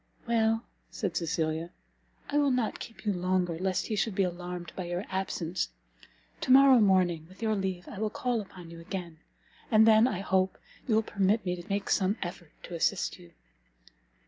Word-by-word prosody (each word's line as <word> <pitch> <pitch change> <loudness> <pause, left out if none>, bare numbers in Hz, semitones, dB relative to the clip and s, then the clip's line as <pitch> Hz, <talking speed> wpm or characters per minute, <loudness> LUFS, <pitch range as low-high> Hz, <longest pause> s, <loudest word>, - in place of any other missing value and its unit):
"Well," 225 -1 +2 0.3
said 195 -6 -3
Cecilia, 160 0 -1 0.6
"I 295 - +1
will 285 -1 +3
not 250 -4 0
keep 225 - -10
you 205 - +2
longer, 180 -2 0
lest 185 0 0
he 215 - -2
should 205 0 0
be 195 - +3
alarmed 175 -1 -4
by 185 - -4
your 175 +3 -3
absence. 185 -2 -2 0.7
To 255 - -1
morrow 265 -1 +8
morning, 180 -6 +3
with 190 +4 -11
your 220 -1 +2
leave, 190 -3 -3
I 200 - -8
will 215 0 0
call 240 +1 -1
upon 180 -4 -11
you 170 - -10
again, 170 -2 -6 0.5
and 220 0 +6
then, 220 +2 +7
I 195 -7 -2
hope, 190 -1 +1 0.3
you 225 - +3
will 220 - +3
permit 200 +1 +1
me 180 -1 0
to 175 +4 -11
make 200 0 -1
some 195 +2 +2
effort 175 -3 -8
to - - -8
assist 175 +3 0
you." 175 -1 -16
190 Hz, 185 wpm, -29 LUFS, 175-220 Hz, 0.7 s, morrow